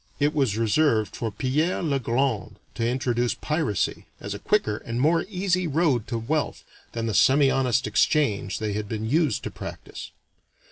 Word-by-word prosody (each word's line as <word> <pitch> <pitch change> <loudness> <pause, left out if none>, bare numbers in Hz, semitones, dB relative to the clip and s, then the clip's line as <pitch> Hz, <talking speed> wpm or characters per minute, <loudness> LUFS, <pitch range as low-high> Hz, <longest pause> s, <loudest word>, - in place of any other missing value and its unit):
It 145 +1 +2
was 135 -9 +1
reserved 115 -2 +2
for 115 - -2
Pierre 145 - 0
le 140 -4 +1
Grand 120 -2 -1 0.2
to 115 - -1
introduce 120 -1 0
piracy 150 - -1
as 100 - -5
a 100 - -6
quicker 200 - +1
and 115 +1 -5
more 160 +5 +3
easy 185 -2 0
road 145 -7 +1
to 120 - -2
wealth 145 +7 -2 0.3
than 115 -1 -3
the 110 - -1
semihonest 130 +1 +3
exchange 105 - +1
they 110 -2 -2
had 105 0 -4
been 110 0 -3
used 145 - +1
to - - -4
practice. - - -8
130 Hz, 160 wpm, -25 LUFS, 110-150 Hz, 0.3 s, more